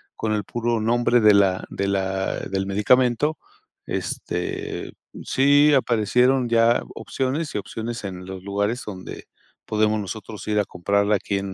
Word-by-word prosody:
con 110 - -2
el 105 -1 -1
puro 120 +2 -1
nombre 120 +2 +3
de 105 -2 +6
la 95 -2 +3
de 100 - -2
la 95 -1 -1
del 95 0 -3
medicamento, 125 +8 +2 0.5
este 390 +1 -4 0.3
Sí 145 +2 +4
aparecieron 125 +1 +2
ya 115 0 +4
opciones 140 +4 -3
y - - -2
opciones 115 +3 -6
en 90 -2 -6
los 95 0 -8
lugares 100 +4 -1
donde 95 -3 -8 0.4
podemos 110 0 +1
nosotros 105 +1 -7
ir 105 0 +1
a 105 - +1
comprarla 100 +4 +1
aquí 100 0 -2
en 95 0 -4
110 Hz, 145 wpm, -23 LUFS, 100-125 Hz, 0.5 s, de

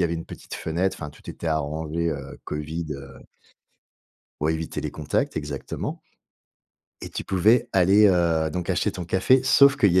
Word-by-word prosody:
y 90 - +4
avait 85 0 0
une 80 - -5
petite - - -9
fenêtre, 90 +4 -1
enfin, 75 - -5
tout - - -11
était 85 - -7
arrangé, 80 +2 -1
heu, 70 -2 -6
Covid, 80 +2 -4
heu 70 -1 -8 1.3
pour 75 - +2
éviter 80 0 -3
les - - -3
contacts, 75 0 -1
exactement. 75 -2 -4 1.0
Et - - -7
tu - - -4
pouvais 105 +6 +3
aller, 95 +3 +5
heu, 85 -3 +2
donc 90 +2 -4
acheter 90 - +1
ton 90 -1 -6
café, 95 +9 +3
sauf 140 +1 +6
qu'il 100 -9 +4
y 95 - +5
85 Hz, 175 wpm, -24 LUFS, 75-95 Hz, 1.3 s, sauf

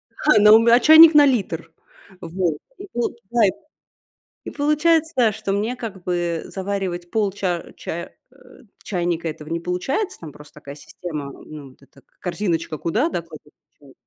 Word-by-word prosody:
ха, 300 -8 +3
на 210 +1 +7
ум 230 +1 +5
а, 240 +1 +6
чайник 315 +3 +8
на 295 -1 +7
литр. 175 - -1 0.5
Вот. 170 -3 -2 0.2
И 400 - -9
получает 235 -3 0 0.9
и - - -6
получается, 300 -4 +2
что 210 -1 -5
мне 220 +5 -2
как 205 -7 -8
бы 175 -2 -2
заваривать 190 -3 -4
полча 195 -4 -1
а, - - -17
чая 170 +1 -7 0.2
э, - - -25 0.5
чайника 175 -3 -2
этого 155 0 -7
не 165 0 -2
получается. 185 - -3
Там 155 -3 -9
просто 150 +2 -16
такая 145 -1 -11
система, 150 -2 -8
ну, - - -15 0.2
м 135 - -13
вот 130 - -26
эта 135 0 -21
к - - -43
корзиночка, 170 -4 -3
куда, 225 - -1
да, 170 - -3
кладете 155 -2 -15 0.3
чай. 140 -2 -18
185 Hz, 165 wpm, -21 LUFS, 165-235 Hz, 0.9 s, чайник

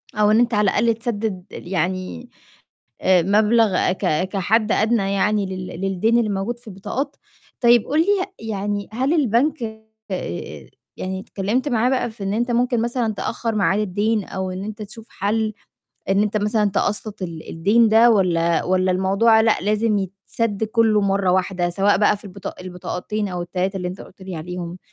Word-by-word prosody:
أو 210 0 +3
إن 220 - +5
أنت 240 -1 +2
على 210 -2 +3
الأقل 230 +2 +2
تسدِّد 220 -5 -3
يعني 185 +7 -3 0.8
مبلغ 200 +2 +3
ك 185 -1 0
كحد 210 +3 +1
أدنى 215 -3 +2
يعني 205 +1 +1
لل 185 -1 -6
للدَّين 195 +5 +1
اللي 220 -3 0
موجود 210 +5 -3
في 240 - -20
البطاقات. 255 +9 -4 0.5
طيب 240 -2 +5
قُل 300 +3 +1
لي 345 - 0 0.4
يعني 205 0 -3
هل 265 +6 +1
البنك 275 0 +2 0.5
آآ، 135 - -5 0.3
يعني 190 0 -4
اتكلمت 215 +9 -2
معاه 240 0 +2
بقى 255 -3 0
في 215 -2 -9
إن 195 +1 -1
أنت 240 +2 0
ممكن 240 -1 +1
مثلًا 235 -2 -1
تأخَّر 230 +2 -3
ميعاد 200 0 +2
الدَّين 210 +2 0
أو 190 -1 -4
إن 185 +2 -5
أنت 215 +1 -7
تشوف 220 +2 -10
حَلّ، 215 +2 -1 0.6
إن 195 +2 +3
أنت 210 0 -1
مثلًا 210 0 +1
تقسَّط 210 +1 -2
ال 165 -3 -6
الدَّين 210 +8 +3
ده 225 +2 +6
والَّا 170 -5 +2
والَّا 185 0 +2
الموضوع 200 +5 +3
لأ 220 0 +3
لازم 210 +1 +1
يتسَدّ 200 +3 -3
كُلّه 220 -1 +3
مرّه 195 -1 +1
واحدة، 180 -1 0
سواء 195 +3 +2
بقى 210 0 +3
في 205 - -16
البطا 195 -1 -7
البطاقتين 185 +3 -4
أو 180 -1 -3
ال3 185 +2 -2
اللي 180 -1 -3
أنت 185 - -8
قُلت 190 - -13
لي 185 -2 -6
عليهم، 175 +2 -6
205 Hz, 170 wpm, -21 LUFS, 190-225 Hz, 0.8 s, ده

